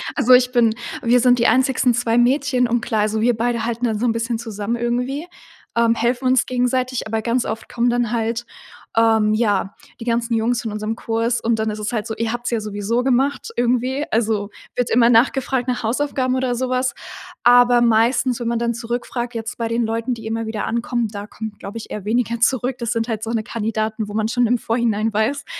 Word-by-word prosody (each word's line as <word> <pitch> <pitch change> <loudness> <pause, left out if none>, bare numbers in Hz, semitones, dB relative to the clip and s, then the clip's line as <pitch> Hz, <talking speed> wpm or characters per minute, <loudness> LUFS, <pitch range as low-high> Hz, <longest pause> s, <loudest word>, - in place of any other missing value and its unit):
Also, 255 -3 +4
ich 250 0 +5
bin 235 -3 +3 0.3
wir 240 +1 +4
sind 245 0 +4
die 235 - +4
einzigen 260 -1 +3
2 235 0 +1
Mädchen. 255 0 +2
Und 240 0 0
klar, 220 -3 0
also, 215 +1 0
wir 240 0 +3
beide 235 0 -1
halten 235 +1 -2
dann 220 -2 -1
so 245 - 0
'n 230 - +3
bisschen 230 0 -2
zusammen 225 -1 -4
irgendwie. 250 +7 -2 0.5
Ähm, 230 0 +3
helfen 240 +3 0
uns 255 -1 +3
gegenseitig, 255 0 0
aber 220 0 -1
ganz 235 +2 0
oft 225 - -5
kommen 240 0 +1
dann 240 -2 0
halt, 230 0 -2 0.5
ähm, 220 -1 +4
ja, 205 -3 0 0.2
die 230 - -7
ganzen 235 0 0
Jungs 225 +1 +1
von 220 - -4
unserem 215 +1 -3
Kurs 230 +1 -1
und 225 -1 0
dann 220 0 0
ist 210 - -4
es 215 +3 -4
halt 220 0 -2
so: 220 - -4
„Ihr 230 0 -2
habt's 240 0 -3
ja 230 -2 0
sowieso 210 +3 -2
gemacht“, 265 +1 0
irgendwie. 250 +3 0
Also 215 -2 0 0.3
wird 245 -1 0
immer 235 0 +4
nachgefragt 255 +1 +2
nach 245 -2 -2
Hausaufgaben 255 +1 0
oder 255 -1 0
sowas. 255 +1 -1 0.5
Aber 245 0 +6
meistens, 235 +2 +2
wenn 235 - -3
man 235 0 0
dann 235 0 0
zurückfragt, 240 +1 -4
jetzt 225 +1 -5
bei 230 - -1
den 230 0 0
Leuten, 230 +2 -2
die 225 - -11
immer 225 0 -3
wieder 220 -1 -3
ankommen, 235 -1 -1
da 205 0 -7
kommt, 220 -2 -8
glaube 205 +3 -7
ich, 225 - -9
eher 205 -2 -6
weniger 235 +1 0
zurück. 255 +1 +1
Das 235 0 -2
sind 230 0 -1
halt 220 -2 -3
so, 225 - -4
ne, 225 -2 -1
Kandidaten, 215 -1 -3
wo 205 - -7
man 220 0 +1
schon 245 -1 +2
im 245 +1 +2
Vorhinein 225 -2 0
weiß, 245 +7 0
235 Hz, 215 wpm, -20 LUFS, 225-245 Hz, 0.5 s, Aber